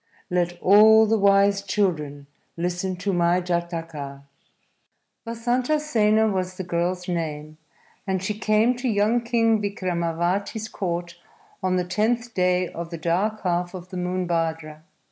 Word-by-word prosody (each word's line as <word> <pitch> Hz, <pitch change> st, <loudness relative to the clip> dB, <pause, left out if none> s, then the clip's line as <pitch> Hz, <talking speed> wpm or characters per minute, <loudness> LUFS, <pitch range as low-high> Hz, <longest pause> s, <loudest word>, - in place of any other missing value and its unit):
_ -, -, -48 dB, 0.3 s
LET 175 Hz, -1 st, 0 dB
ALL 220 Hz, +3 st, +7 dB
THE 220 Hz, 0 st, +1 dB
WISE 200 Hz, 0 st, +4 dB
CHILDREN 160 Hz, -8 st, -1 dB, 0.3 s
LISTEN 180 Hz, +2 st, -2 dB
TO 195 Hz, +2 st, -2 dB
MY 175 Hz, 0 st, +2 dB
JATAKA! 165 Hz, -5 st, -4 dB, 1.0 s
Vasantasena 235 Hz, -2 st, +1 dB
was 185 Hz, -1 st, -3 dB
the 190 Hz, -, -4 dB
girl's 175 Hz, +1 st, -2 dB
name, 155 Hz, -3 st, -4 dB, 0.5 s
and 190 Hz, -1 st, -1 dB
she 210 Hz, -, -1 dB
came 220 Hz, +3 st, +2 dB
to 250 Hz, 0 st, -2 dB
young 215 Hz, +3 st, +2 dB
King 230 Hz, -2 st, +2 dB
Vikramavati's 185 Hz, +2 st, -2 dB
court 175 Hz, -2 st, -4 dB, 0.4 s
on 185 Hz, 0 st, 0 dB
the 180 Hz, -1 st, 0 dB
tenth 230 Hz, +5 st, -1 dB
day 180 Hz, 0 st, +1 dB
of 170 Hz, 0 st, -7 dB
the 170 Hz, -, -6 dB
dark 185 Hz, +7 st, -1 dB
half 175 Hz, 0 st, -1 dB
of 180 Hz, 0 st, -9 dB
the 185 Hz, -, -6 dB
month 180 Hz, 0 st, -2 dB
Bhadra. 160 Hz, -2 st, -2 dB
185 Hz, 140 wpm, -24 LUFS, 170-215 Hz, 1.0 s, ALL